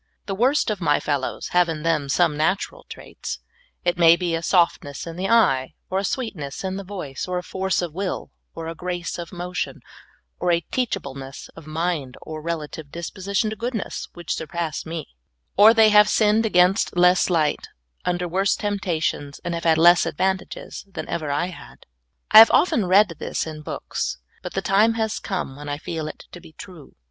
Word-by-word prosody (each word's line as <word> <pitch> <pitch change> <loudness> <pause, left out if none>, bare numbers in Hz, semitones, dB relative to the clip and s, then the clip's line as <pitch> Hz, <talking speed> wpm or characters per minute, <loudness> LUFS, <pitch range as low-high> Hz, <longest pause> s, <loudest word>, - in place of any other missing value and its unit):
The 195 - -3
worst 250 +4 +2
of 205 -3 -4
my 145 -3 +3
fellows 145 -3 -2
have 180 -1 +3
in 155 -2 -4
them 155 -4 0
some 165 +2 +2
natural 160 +6 -1
traits - - -7 0.2
— - - -37
it 175 0 +1
ma}^ 170 -1 +7
be 175 -2 -1
a 165 - -1
softness 170 -6 +1
in 165 -1 -7
the 185 +2 -2
eye, 135 - +3 0.2
or 190 - +1
a - - -2
sweetness 190 - -4
in 190 0 -2
the 200 - -5
voice, 180 -9 -6
or 180 0 -2
a 180 - -3
force 190 +1 -1
of 170 -3 -5
will, 190 +1 -4 0.2
or 165 0 -6
a 165 - -4
grace 175 0 -4
of 170 -1 -7
motion, 180 0 -4 0.6
or 180 - +1
a 170 -1 +1
teachableness 140 - -4
of 165 -2 -14
mind, 155 -4 -2
or 155 -1 -7
relative 160 -2 -5
disposi 185 +5 -6
tion 215 +2 +2
to - - -4
goodness 230 -1 -4
— - - -45
which 175 -1 -3
surpass 165 -1 -4
me; 165 -1 -4 0.5
or 210 +3 +8
they 225 -1 +6
have 210 0 +6
sinned 215 +1 +3
against 180 -1 +3
less 180 +1 +4
light, 160 -4 +1 0.4
under 180 0 -1
worse 190 +3 +1
temptations, 170 -8 -2
and 175 - -2
have 170 0 -4
had 160 -1 +4
less 175 +1 +6
advantages 190 +4 -3
than 190 - -6
ever 155 -3 -2
I 145 +4 0
had. 65 - -14 0.5
I 215 - +11
have 225 - +10
often 230 - +3
read 195 +2 +5
this - - -2
in 155 -1 -7
books, 150 - -4 0.2
but - - -7
the - - -1
time 215 +4 +3
has 220 -1 -1
come 180 -9 -4
when 145 +1 -8
I 145 - -2
feel 160 0 -5
it 155 - -9
to 175 - -10
be 160 - -15
true. 170 -3 -12
175 Hz, 195 wpm, -23 LUFS, 160-195 Hz, 0.6 s, I